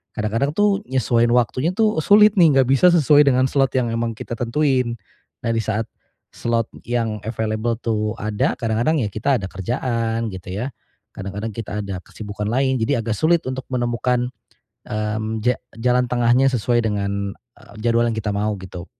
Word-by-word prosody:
Kadang-kadang 115 +7 0
tuh, 205 -1 +2
nyesuain 120 -2 +2
waktunya 125 +6 +1
tuh, 215 -5 +2
sulit 210 +5 +6
nih 160 -6 +6
nggak 130 -2 +4
bisa 135 +7 +5
sesuai 150 -3 +5
dengan 130 -1 +4
slot 135 -2 +2
yang 120 -3 +1
memang 115 0 -2
kita 115 - -7
tentuin. 125 0 +1 0.5
Nah 115 - 0
di 115 - 0
saat 110 0 -2 0.5
slot 115 -1 -1 0.2
yang 115 -3 -1
available 110 +1 -1
tuh 110 -2 -1
ada, 105 -1 0
kadang-kadang 120 +6 +1
ya 105 - -1
kita 130 +6 +1
ada - - -4
kerjaan, 115 +2 -2
gitu 90 -1 -8
ya. 135 - -4 0.4
Kadang-kadang 100 +3 -5
kita 105 -2 -4
ada 100 -2 -5
kesibukan 105 -1 -6
lain. 130 +2 +1
Jadi 110 +6 +1
agak 115 -2 -2
sulit 165 +5 +3
untuk 130 0 -5
menemukan, 125 0 0 0.6
mmm, 110 +1 -2
ja 125 +1 +3 0.2
jalan 125 +2 +2
tengahnya 120 +2 +3
sesuai 120 0 +1
dengan, 100 -2 -2 0.3
e - - -19 0.2
jadwal 115 0 +2
yang 115 - -2
kita 110 -1 -2
mau 105 +1 0
gitu. 90 -1 -8
115 Hz, 165 wpm, -21 LUFS, 110-130 Hz, 0.6 s, sulit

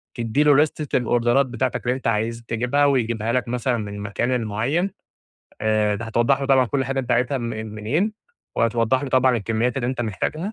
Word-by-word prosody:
تدّي 120 +5 +1
له 145 -1 +5
ليستة 150 0 +1
الأوردرات 120 +2 +2
بتاعتك 125 0 -2
اللي 125 +1 +1
أنت 130 - -4
عايز 115 +1 -1
تجيبها 125 +5 +1
ويجيبها 115 -5 +1
لك 125 -1 0
مثلًا 125 +1 -1
من 105 -2 -5
المكان 105 +4 -2
المعيّن، 125 - 0 0.7
آآ، 110 -1 +2
أنت 100 - -5
هتوضّح 120 +4 +1
له 140 - -2
طبعًا 135 -2 +4
كلّ 135 +2 -1
حاجة 135 +1 -2
أنت 125 -1 -7
عايزها 125 +3 +1
م - - -5
منين 110 - -2 0.4
وهتوضّح 115 +3 +1
له 140 - -3
طبعًا 130 -1 +3
الكمّيات 115 +4 -1
اللي 125 -3 -1
أنت 130 0 -2
محتاجها، 150 - -3
120 Hz, 190 wpm, -22 LUFS, 115-135 Hz, 0.7 s, له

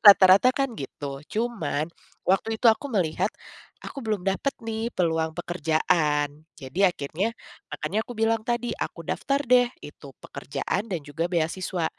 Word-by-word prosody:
Rata-rata 195 +3 +9
kan 275 -2 0
gitu, 140 -3 -6
cuman 210 -10 -1 0.4
waktu 210 +4 +2
itu 250 - +4
aku 285 - -6
melihat, 185 - +1 0.6
aku 275 - -6
belum 215 -6 -2
dapet 195 +8 0
nih 225 0 -2
peluang 160 -2 +1
pekerjaan. 155 -3 +1
Jadi 140 +6 -3
akhirnya, 175 +6 -2 0.4
makanya 215 - -1
aku - - -8
bilang 225 0 +2
tadi 240 +1 -1
aku 165 - -5
daftar 275 - 0
deh 245 0 +5 0.2
itu 145 -1 -11
pekerjaan 165 +9 -3
dan 175 - -1
juga 160 +4 -2
beasiswa. 175 +1 -1
185 Hz, 140 wpm, -26 LUFS, 155-225 Hz, 0.6 s, Rata-rata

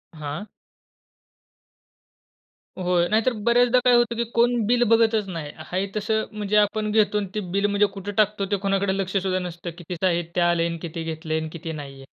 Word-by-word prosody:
हां? 155 +6 -6 2.3
होय. 180 -1 +1
नाहीतर 225 +4 +2
बऱ्याचदा 245 +1 +4
काय 250 - +6
होतं 240 -1 +2
की 235 - 0
कोण 240 +1 +3
बिल 240 +1 +3
बघतच 225 -2 +3
नाही. 160 -5 -5
आहे 180 +5 -3
तसं 220 +1 0
म्हणजे 210 -1 -1
आपण 215 +1 +2
घेतो 210 -1 +3
अन् 205 -1 -1
ते - - 0 0.2
बिल 200 +1 +2
म्हणजे 205 0 +3
कुठं 200 +1 -6
टाकतो 210 -1 +2
ते 200 - +2
कोणाकडं 195 0 +1
लक्षसुद्धा 190 -1 -1
नसतं 175 -1 -6
कितीचं 175 +1 -2
आहे, 175 -1 +1
ते - - +1
आले 170 -1 +3
अन् 170 0 -4
किती 165 -1 -5
घेतले 160 0 -3
अन् 160 0 -5
किती 165 -1 -6
नाही 145 -3 -7
आहे. 135 0 -13
195 Hz, 180 wpm, -24 LUFS, 170-215 Hz, 2.3 s, काय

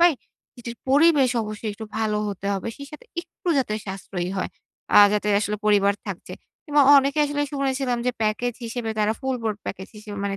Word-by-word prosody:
পাই, 345 -1 +7 0.4
যেটির 235 -1 -8
পরিবেশ 285 -1 +5
অবশ্যই 215 +1 -5
একটু 220 +2 -8
ভালো 220 -1 0
হতে 200 0 -5
হবে। 195 +3 -3
সেই 280 - -9
সাথে 300 - -11 0.2
একটু 345 +1 -9
যাতে 245 -5 0
সাশ্রয়ী 190 -2 -4
হয়। 185 - -2 0.5
আ - - +11
যাতে 210 0 0
আসলে 210 0 -1
পরিবার 200 -1 +4
থাকছে। 195 -3 -6 0.3
কিংবা 295 -1 +3
অ - - +9
অনেকে 275 +2 0
আসলে 290 0 -1
শুনেছিলাম 270 -3 -1
যে - - +4
প্যাকেজ 220 +3 0
হিসেবে 230 0 -3
তারা 210 +1 +2
ফুল 265 -1 -1
বোর্ড 215 -2 -1
প্যাকেজ 190 - -5
হিসেবে 210 -1 -8
মানে 195 0 -2
225 Hz, 190 wpm, -24 LUFS, 205-275 Hz, 0.5 s, আ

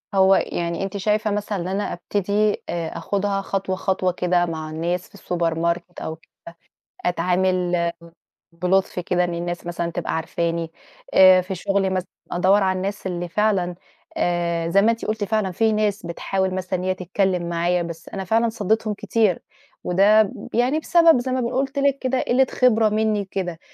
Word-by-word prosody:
هو 190 0 +6
يعني 170 0 -2
أنتِ 195 +1 -4
شايفة 210 +2 0
مثلًا 205 0 -2
إن 175 - -4
أنا 195 +2 -2
أبتدي 205 +4 0
آآ، 170 -1 -3
آخدها 195 +3 -1
خطوة 195 -1 -2
خطوة 185 -1 0
كده 180 0 +1
مع 160 -2 -5
الناس 170 +3 -3
في - - -16
الsupermarket 170 0 -2
أو 160 - -4
كده 160 - -29 0.8
أتعامل 180 0 +1 0.6
بلطف 180 +3 0
كده 180 0 0
إن 175 -1 -2
الناس 175 0 -4
مثلًا 170 0 -3
تبقى 170 0 -3
عارفاني؟ 165 0 -2 0.4
آآ، 185 -1 +8
في 185 +1 -5
شغلي 195 +2 0
مثلًا 185 -1 -2 0.2
أدوّر 190 +3 +3
على 190 -1 +1
الناس 195 +1 -3
اللي 175 -1 -3
فعلًا 190 -2 +1 0.4
آآ، 170 -1 0
زَي 195 +4 +4
ما 220 +3 +4
أنتِ 230 - -4
قُلتِ 215 -1 -2
فعلًا 210 -2 0
في 220 +5 +2
ناس 210 -3 0
بتحاول 190 +2 -2
مثلًا 185 0 -2
إن - - -5
هي 185 0 +1
تتكلم 185 -1 -1
معايا 175 +1 +1
بس 170 -1 -7
أنا 195 - -5
فعلًا 225 +5 +2
صدّيتهم 220 0 0
كتير، 210 -2 +1 0.4
وده 200 +3 +4 0.2
يعني 250 +6 +2
بسبب 330 -3 +5
زَي 255 +1 -3
ما 255 0 0
ب - - -1
قُلت 270 +3 -1
لِك 280 0 +2
كده 260 0 0
قِلة 260 +2 +3
خبرة 225 -4 +3
مني 215 -1 0
كده. 180 -3 -4
190 Hz, 170 wpm, -22 LUFS, 175-210 Hz, 0.8 s, آآ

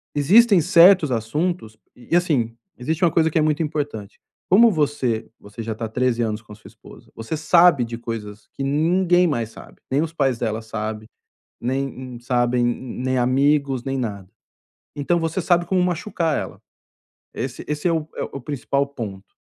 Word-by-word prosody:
existem 195 +7 +5
certos 170 -2 +6
assuntos 115 +1 -2 0.2
e 125 +7 -2
assim, 135 -10 0 0.2
existe 160 +7 -1
uma 170 - +4
coisa 160 0 +2
que 160 - +1
é - - +3
muito 155 +1 +1
importante. 145 -9 -4 0.3
Como 225 +5 +7
você 145 - -1
você 105 +3 -9
já 110 0 -4
tá 115 +1 -6
há - - -3
13 120 +1 0
anos 110 -1 -2
com 110 -1 -15
a - - -9
sua 105 - -15
esposa, - - -17
você 115 +8 -5
sabe 160 -3 +4
de 115 0 -6
coisas 110 -3 -7
que 135 - -5
ninguém 175 +5 +2
mais 120 -9 -2
sabe, - - -14
nem 135 +2 +2
os 165 0 -3
pais 135 -6 0
dela 110 -1 -2
sabem, 110 -1 -5 0.5
nem 135 +3 -1
m 125 -2 -9
sabem, 120 -1 +1
mm 120 +1 -3
nem 130 0 0
amigos, 135 +1 +2
nem 135 0 -2
nada. 100 -6 -5 0.7
Então, 160 +4 0
você 165 +3 -2
sabe 175 0 +2
como 185 +1 +1
machucar 175 -2 -1
ela. - - -6 0.7
Esse 125 +1 -5
esse 150 +4 -2
é - - +2
o 160 -2 -1
é - - -3
o 140 - -7
principal 140 +1 -1
ponto. 105 -8 -8
135 Hz, 180 wpm, -22 LUFS, 115-165 Hz, 0.7 s, Como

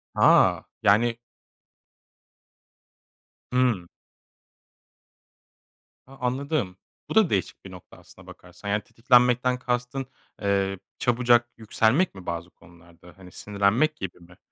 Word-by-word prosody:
Ha! - - +4 0.2
Yani 115 +3 +3 2.3
Hımm. 125 -9 +1 2.2
A, 135 - -14
anladım. 130 - -2 0.3
Bu - - -5
da 220 -6 +5
değişik 95 -1 -3
bir 95 - -10
nokta 90 -1 -14
aslında - - -18
bakarsan. 100 - -11
Yani 105 +1 0
tetiklenmekten 125 +2 +2
kastın, 125 +2 -3 0.4
eee, 100 -1 0 0.2
çabucak 120 0 +2
yükselmek 115 - +1
mi 95 -2 -11
bazı 85 0 -5
konularda? 85 0 -19
Hani, 90 -2 -14
sinirlenmek 105 - 0
gibi 95 - -7
mi? 85 +1 -18
110 Hz, 105 wpm, -25 LUFS, 95-125 Hz, 2.3 s, da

